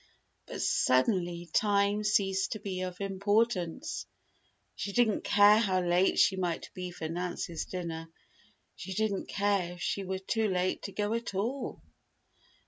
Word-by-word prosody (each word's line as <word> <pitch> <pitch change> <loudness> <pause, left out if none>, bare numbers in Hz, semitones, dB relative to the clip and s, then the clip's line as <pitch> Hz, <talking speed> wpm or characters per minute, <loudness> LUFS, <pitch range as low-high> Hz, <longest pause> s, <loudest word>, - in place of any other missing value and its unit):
But - - -4
suddenly 175 - +2
time 205 0 +2
ceased 195 -2 +1
to 215 - -6
be 190 -3 -4
of 180 -1 -5
importance. 200 - 0 0.7
She 200 - -5
didn't 230 -2 +2
care 205 +1 +6
how 190 -5 +2
late 175 +2 +2
she 190 - +5
might 175 -3 -2
be 180 -1 -5
for 165 -2 -5
Nancy's 170 0 -3
dinner. 165 -3 -5 0.7
She 190 +1 -7
didn't 215 -2 -1
care 200 -3 0
if 175 - -12
she 200 - -1
were 190 0 -3
too 220 +3 0
late 185 -1 0
to 200 - -6
go 205 +2 -1
at 230 -3 -3
all! 240 +8 -3
195 Hz, 145 wpm, -30 LUFS, 180-205 Hz, 0.7 s, care